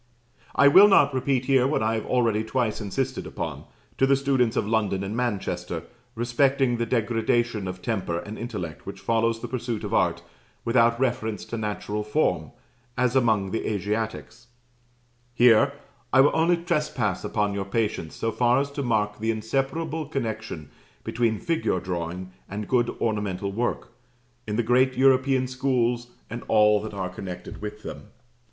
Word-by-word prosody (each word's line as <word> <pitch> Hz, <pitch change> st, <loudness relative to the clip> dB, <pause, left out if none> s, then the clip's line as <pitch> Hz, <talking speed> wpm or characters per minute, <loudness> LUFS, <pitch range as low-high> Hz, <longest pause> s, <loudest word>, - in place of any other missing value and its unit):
I 140 Hz, -, +6 dB
will 190 Hz, +8 st, +9 dB
not 195 Hz, -8 st, +5 dB
repeat 130 Hz, -1 st, 0 dB
here 130 Hz, -2 st, +4 dB
what 140 Hz, -5 st, 0 dB
I 110 Hz, +1 st, +1 dB
have 110 Hz, -, -3 dB
already 115 Hz, -4 st, +2 dB
twice 110 Hz, -1 st, -1 dB
insisted 105 Hz, +6 st, -3 dB
upon, -, -, -5 dB, 0.3 s
to 135 Hz, -, +4 dB
the 135 Hz, -, +5 dB
students 135 Hz, -4 st, +1 dB
of -, -, 0 dB
London 105 Hz, -3 st, 0 dB
and 100 Hz, +3 st, -4 dB
Manchester, 95 Hz, -8 st, -2 dB, 0.3 s
respecting 120 Hz, +2 st, +2 dB
the 115 Hz, 0 st, -1 dB
degradation 115 Hz, -2 st, 0 dB
of 90 Hz, 0 st, -7 dB
temper 95 Hz, -7 st, -1 dB
and 105 Hz, +4 st, -6 dB
intellect 105 Hz, -10 st, -6 dB
which -, -, -7 dB
follows 115 Hz, 0 st, 0 dB
the -, -, -4 dB
pursuit 120 Hz, -3 st, -3 dB
of -, -, -4 dB
art -, -, +1 dB, 0.4 s
without 115 Hz, 0 st, +3 dB
reference 120 Hz, -4 st, -1 dB
to -, -, -5 dB
natural 105 Hz, -1 st, -3 dB
form, 105 Hz, +9 st, 0 dB, 0.5 s
as 125 Hz, +1 st, +1 dB
among 110 Hz, -7 st, +2 dB
the 115 Hz, -, -2 dB
Asiatics: 110 Hz, +3 st, -3 dB, 0.9 s
here, 120 Hz, +3 st, +6 dB, 0.4 s
I 130 Hz, -, +6 dB
will 145 Hz, -, +5 dB
only 170 Hz, +2 st, +3 dB
trespass 150 Hz, -, -1 dB
on 105 Hz, -2 st, 0 dB
your 100 Hz, -1 st, -3 dB
patience 105 Hz, -5 st, -2 dB
so 115 Hz, -, -1 dB
far 120 Hz, +2 st, +3 dB
as 140 Hz, 0 st, -2 dB
to 140 Hz, -, -4 dB
mark 105 Hz, -4 st, 0 dB
the 110 Hz, +1 st, -1 dB
inseparable 135 Hz, +8 st, -2 dB
connection 110 Hz, -, -4 dB, 0.3 s
between 115 Hz, -2 st, 0 dB
figure 165 Hz, -, 0 dB
drawing 90 Hz, +1 st, -4 dB, 0.2 s
and 105 Hz, +1 st, -5 dB
good 120 Hz, -2 st, +2 dB
ornamental 100 Hz, -3 st, -1 dB
work, 120 Hz, +4 st, -2 dB, 0.6 s
in 105 Hz, -, -2 dB
the 120 Hz, -, +1 dB
great 130 Hz, +3 st, +3 dB
European 130 Hz, 0 st, +4 dB
schools, 125 Hz, -2 st, 0 dB, 0.2 s
and 115 Hz, +2 st, -6 dB
all 105 Hz, -1 st, +4 dB
that 105 Hz, -1 st, -7 dB
are 95 Hz, -2 st, -3 dB
connected 95 Hz, -2 st, -8 dB
with 105 Hz, 0 st, -7 dB
them. -, -, -8 dB
115 Hz, 160 wpm, -25 LUFS, 105-130 Hz, 0.9 s, will